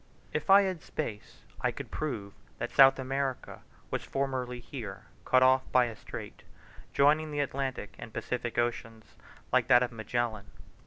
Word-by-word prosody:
If 150 0 -3
I 200 +1 +8
had 185 -4 -2
space 110 -9 -6 0.2
I - - +2
could - - -7
prove 110 -10 -4 0.2
that - - -4
South 135 -1 +7
America 135 0 -3 0.3
was - - -2
formerly 130 -2 -2
here 120 - -8 0.2
cut 130 0 +5
off 130 0 +5
by 125 -1 +5
a 115 -2 -5
strait, - - -9 0.5
joining 150 +2 +3
the 145 -1 -3
Atlantic 135 -5 -3
and 115 - -8
Pacific 120 +1 -3
oceans, 115 -2 -3 0.4
like - - +4
that 125 0 +6
of 125 - -2
Magellan. 110 -1 -2
130 Hz, 155 wpm, -30 LUFS, 120-140 Hz, 0.5 s, I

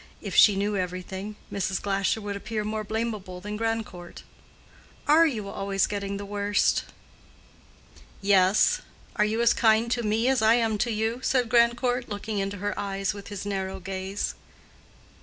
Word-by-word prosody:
If - - -6
she 205 - +7
knew 205 +1 0
everything, 190 +2 -4 0.2
Mrs. 190 -1 -1
Glasher 200 +2 0
would 205 -1 -4
appear 215 +1 -3
more 215 0 -3
blamable 215 -4 -4
than 210 +3 -5
Grandcourt. 220 -6 -4 0.8
"Are 320 +3 +6
you 220 -9 -3
always 195 0 0
getting 200 -1 -3
the 200 - -6
worst?" 205 0 +1 1.3
"Yes. 195 0 +4 0.4
Are 210 - +4
you 220 +2 0
as 235 - +5
kind 225 0 +3
to 240 - +1
me 225 +2 +1
as 265 -3 +3
I 220 +1 +5
am 225 -3 +1
to 240 +3 +1
you?" 220 +2 -1
said 250 -3 +1
Grandcourt, 240 +1 +2
looking 205 0 -3
into 195 +1 -2
her 205 +1 -2
eyes 195 0 -2
with 200 -1 -10
his 205 -1 -6
narrow 190 -1 -3
gaze. 190 +1 -3
205 Hz, 160 wpm, -26 LUFS, 195-225 Hz, 1.3 s, she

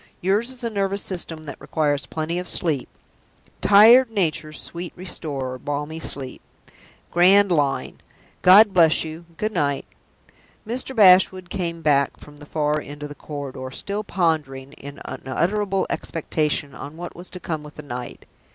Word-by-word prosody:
Yours 205 +6 +1
is 255 -1 -7
a 235 - -1
nervous 200 -1 -1
system 170 -4 -4
that 145 -3 -9
requires 145 -2 -1
plenty 160 +5 -3
of 180 - -6
sleep. 155 -7 0 0.7
'Tired 225 +5 +7
nature's 160 -7 -2
sweet 170 0 -7
restorer, 140 -8 -5
balmy 145 +3 -4
sleep.' 135 -5 -3 0.7
Grand 190 +3 +5
line! 145 -5 0 0.4
God 200 +3 +7
bless 165 -3 +5
you 160 +1 -8
good 215 +1 -1
night!" 140 -7 0 0.8
Mr. 255 +3 -3
Bashwood 185 -3 +5
came 170 -3 -3
back 140 -2 +2
from 145 0 -14
the 145 0 -13
far 150 0 0
end 145 +1 -9
of 150 - -5
the - - -7
corridor 140 -3 -7
still 200 +9 -4
pondering, 150 -8 -1
in 140 +1 -10
unutterable 195 +8 -1
expectation, 150 -3 -2
on 145 +4 -9
what 175 +1 -7
was 175 +1 -9
to 180 - -8
come 160 -3 -4
with 150 0 -12
the 150 - -9
night. 125 -3 -7
160 Hz, 150 wpm, -23 LUFS, 145-190 Hz, 0.8 s, Tired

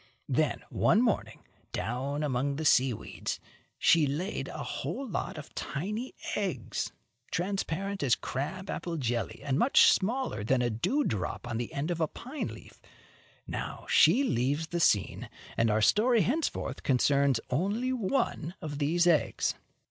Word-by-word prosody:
Then, - - +1
one - - +4
morning, 230 -5 -1 0.3
down 130 +8 -2
among 140 0 0
the 160 +2 -3
sea 130 -2 +5
weeds, 110 - -5 0.4
she 160 -3 +5
laid 165 +9 -2
a - - -5
whole 275 - -4
lot 185 - -3
of 155 - -9
tiny 210 - -4 0.2
eggs, 180 - -2 0.4
transparent 195 +1 -2
as 135 -4 +4
crab 185 +9 -4
apple 170 -3 -3
jelly 120 -4 -2
and 140 -1 +1
much 255 - +6
smaller 230 - 0
than 125 +3 +2
a 120 - +1
dew 245 - +1
drop 105 - -3
on 115 -2 -2
the 120 - -4
end 145 +5 -2
of 170 -1 -2
a 160 - +3
pine 265 - -5
leaf. - - -11 0.6
Now - - -5
she 275 - +6
leaves 145 - 0
the 170 - -1
scene, 105 - +2 0.3
and 115 0 +2
our 110 0 +2
story 225 - +4
henceforth 295 - -1
concerns 140 -1 +3
only 205 - 0
one 215 - -1
of 145 -2 -5
these 165 +4 +2
eggs. 170 -4 +2
155 Hz, 150 wpm, -30 LUFS, 130-200 Hz, 0.6 s, much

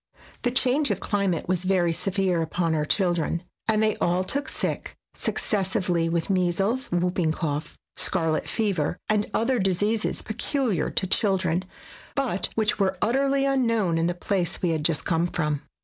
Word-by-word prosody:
The 245 - +1
change 265 +3 +2
of - - 0
climate 200 -5 -1
was 180 0 0
very 180 -3 +2
severe 185 -1 0
upon 165 +1 0
our 150 -1 0
chil 180 +2 +2
dren, 170 +1 -2 0.2
and 220 -1 +3
they 215 -1 +1
all 180 +2 +1
took 280 +9 -1
sick, - - -3 0.2
successively, 185 -4 0
with 165 -1 -1
measles, 195 +7 +1
whooping 175 -2 0
cough, 150 0 -3 0.2
scarlet 160 -1 0
fever 195 -9 0
SKETCHES 210 -1 +2
OF - - -17
TRAVEL - - +1
and - - +1
other 255 0 +1
diseases 205 +3 0
peculiar 240 - 0
to - - 0
children, 185 -2 +1 0.5
but 255 -9 0
which 215 -1 +1
were 195 -1 +1
utterly 275 +4 +2
unknown 230 -11 +2
in 165 - +2
the 175 - -1
place 180 -1 -1
we 180 - +3
had 155 -2 -1
just 155 -1 +2
come 170 0 +1
from. 150 -4 -1
185 Hz, 170 wpm, -25 LUFS, 170-220 Hz, 0.5 s, and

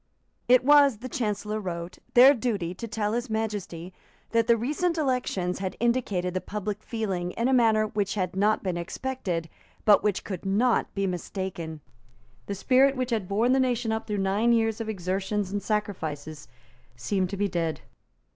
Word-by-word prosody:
It 250 0 +5
was, 285 -4 +6
the 245 +4 -7
Chancellor 210 -3 -2
wrote, 170 -3 -6 0.2
their 260 +3 +9
duty 210 -9 -2
to 230 +5 -7
tell 215 -2 -2
His 240 +2 -2
Majesty 205 -5 -4 0.4
that 230 0 +2
the 235 -1 +5
recent 305 +9 -1
elections 250 - -1
had 190 -1 -4
indicated 220 -7 0
the 185 - -1
public 210 0 -4
feeling 190 -7 -3
in 235 - 0
a 265 - +2
manner 220 -3 +4
which 205 -2 -2
had 185 -3 -2
not 210 +3 +2
been 185 -3 -1
expected, 175 -2 -3 0.4
but 210 -2 +6
which 210 -2 0
could 185 -4 -6
not 220 +5 +1
be 195 0 0
mistaken. 180 -3 -4 0.7
The 200 - -3
spirit 265 +7 +4
which 255 -1 -2
had 215 -5 -1
borne 220 +6 +2
the 265 - +3
nation 245 -3 +1
up 220 0 -3
through 210 -1 -2
nine 200 +5 +2
years 225 -1 +1
of 220 - -4
exertions 195 +1 -2
and 205 0 -2
sacrifices 155 -9 -3 0.5
seemed 185 +9 -1
to 200 - -5
be 205 +1 +1
dead. 170 -4 -2
210 Hz, 175 wpm, -27 LUFS, 185-235 Hz, 0.7 s, their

